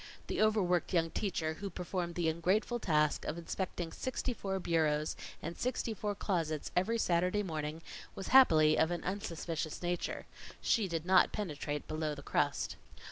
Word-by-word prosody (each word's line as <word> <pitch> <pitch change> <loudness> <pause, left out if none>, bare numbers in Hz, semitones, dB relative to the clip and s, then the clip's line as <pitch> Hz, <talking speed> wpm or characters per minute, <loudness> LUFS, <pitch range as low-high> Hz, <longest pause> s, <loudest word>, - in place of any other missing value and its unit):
The - - -1
overworked 190 -6 +2
young 165 -1 +2
teacher, 165 -5 -1
who 200 -1 -4
performed 180 -1 -3
the 175 -2 +1
ungrateful 185 +9 +1
task 150 -6 +2
of 160 - -3
inspecting 170 0 -3
sixty 255 +5 -2
four 195 -4 -3
bureaus 155 -3 +1 0.3
and 170 +1 -4
sixty 245 -2 -1
four 210 -1 -3
closets 165 -7 -1
every 190 +6 +2
Saturday 180 +1 +2
morning, 160 -2 -4 0.3
was 195 - -5
happily 155 -13 +7
of 160 - +4
an 175 -1 -3
unsuspicious 170 -4 -3
nature. 175 0 -2 0.3
She 215 -4 +2
did 165 -2 -3
not 185 0 +5
penetrate 150 -7 -3
below 155 -1 -2
the 140 - -10
crust. - - 0
175 Hz, 155 wpm, -33 LUFS, 160-195 Hz, 0.3 s, happily